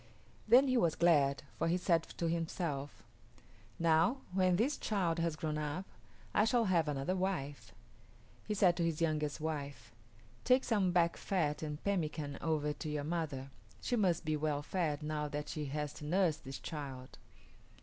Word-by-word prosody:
Then 260 +3 +7
he 255 -1 +2
was 170 -9 +2
glad, 145 -5 +3 0.2
for 165 - +1
he 170 +2 +2
said 170 -2 +2 0.2
to 170 - 0
himself, 165 -4 -3 0.7
"Now, 165 +10 +3
when 185 -1 +3
this 250 +10 +1
child 180 -6 0
has 165 -1 0
grown 155 -1 -2
up, 150 +5 -3 0.5
I 210 - +4
shall 230 +1 +3
have 170 -5 +2
another 145 +5 -1
wife." 180 -7 -3 0.8
He 210 - -1
said 185 -3 +4
to 170 - +1
his 165 -2 0
youngest 155 -3 0
wife, 145 -5 -4 0.5
"Take 255 +1 +4
some 205 -6 +2
back 170 -1 +2
fat 155 -6 -1
and 150 -1 -5
pemmican 155 -7 -2
over 150 -2 0
to 155 - -6
your 150 -1 -2
mother; 145 -4 -3 0.3
she 245 - -1
must 185 -7 +1
be 155 0 +1
well 150 -1 -1
fed 155 -4 -1
now 150 0 -2
that 150 0 -4
she 150 -1 -3
has 150 +1 -3
to 150 - -9
nurse 170 -1 +2
this 135 -2 -8
child." 135 -4 -7
160 Hz, 170 wpm, -34 LUFS, 150-180 Hz, 0.8 s, Then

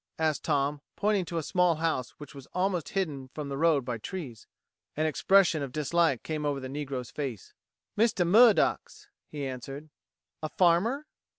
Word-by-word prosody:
asked 155 -2 0
Tom, 145 -1 0
pointing 205 -3 +1
to 170 - -4
a 165 - -1
small 180 0 +2
house 155 -6 -1
which 145 -2 -11
was 140 -2 -11
almost 180 -3 0
hidden 150 -9 -2
from 150 -2 -5
the 140 - -3
road 150 -3 +2
by 120 -3 -3
trees. 135 - -7 0.5
An 155 - +1
expression 170 +2 +3
of 140 -2 -4
dislike 155 -1 +1
came 155 -1 -3
over 145 -2 -1
the 130 - -6
negro's 135 -3 -5
face. 130 -8 -5 0.4
"Mistah 210 -5 +2
Murdock's," 240 - +4 0.2
he 145 -2 -5
answered. 135 +3 -7 0.5
"A 155 - -3
farmer?" 190 - +2
155 Hz, 165 wpm, -28 LUFS, 140-180 Hz, 0.5 s, Murdock's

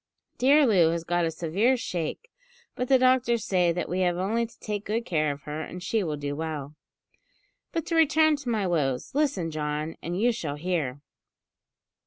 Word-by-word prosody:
Dear 285 +4 +5
Loo 185 -9 +4
has 165 0 -2
got 175 0 +1
a - - +1
severe 180 +11 +1
shake, 185 - -4 0.4
but 250 - -3
the 265 - +6
doctors 255 -3 +2
say 180 -3 +2
that 175 +1 -2
we 180 - -2
have 175 -2 +1
only 225 +6 0
to 235 - -22
take 210 -1 -4
good 230 +3 -1
care 155 -3 +1
of 140 0 -8
her, 150 +1 -5
and 180 +2 -7
she 215 +2 0
will 155 -4 -3
do 145 0 -4
well. 150 -2 -4 1.0
But 330 -2 -2
to 335 - -2
return 315 -1 +4
to 275 -4 -6
my 215 -4 0
woes. 145 - -1
Listen, 270 - 0
John, 150 +1 -3
and 175 +2 -3
you 240 +3 +3
shall 155 -10 -4
hear." 150 -5 -2
180 Hz, 190 wpm, -27 LUFS, 160-235 Hz, 1.0 s, the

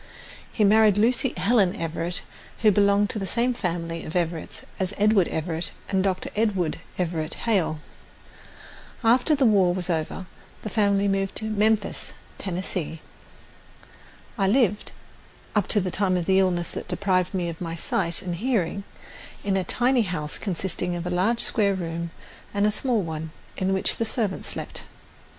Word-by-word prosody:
He 215 - +1
married 210 0 +5
Lucy 240 +4 +2
Helen 200 -4 +3
Everett, 170 0 -3 0.4
who 215 - +7
belonged 200 +1 +3
to 215 - -3
the 195 - -3
same 240 +6 +1
family 165 -5 -3
of 155 - -7
Everetts 170 -2 -2 0.2
as 190 +1 -2
Edward 205 -3 +4
Everett 160 +1 -2 0.2
and 190 -1 +2
Dr. 185 -1 -1
Edward 200 -7 0 0.2
Everett 165 -3 -2
Hale. 190 -8 +2 1.3
After 250 +7 +4
the 275 -2 +2
war 190 -5 +4
was 180 -1 -2
over 165 +3 -2 0.4
the 215 - -4
family 200 -2 +2
moved 195 -1 0
to 220 - 0
Memphis, 215 -1 +1 0.3
Tennessee. 180 -3 -3 1.4
I 195 - +3
lived, 210 -2 +2 0.6
up 210 -3 +2
to 210 - +4
the 185 -2 -2
time 190 -1 +2
of 175 - -2
the 190 +1 +4
illness 175 -2 +1
that - - -6
deprived 185 -2 0
me 180 -2 0
of 165 0 -6
my 165 -1 -3
sight 170 +2 0
and 175 -2 -3
hearing, 200 -4 0 0.6
in 200 -1 +1
a 190 - +1
tiny 245 +7 +2
house 170 -7 -3
consisting 180 -2 -2
of 175 0 -4
a 180 - -2
large 200 +7 +2
square 200 -3 +2
room 170 -1 -4 0.5
and 200 0 +3
a 210 - +3
small 230 -1 +1
one, 160 -1 -4 0.3
in 185 0 0
which 190 0 +1
the 230 - 0
servant 215 -4 -2
slept. - - -5
190 Hz, 160 wpm, -25 LUFS, 175-210 Hz, 1.4 s, who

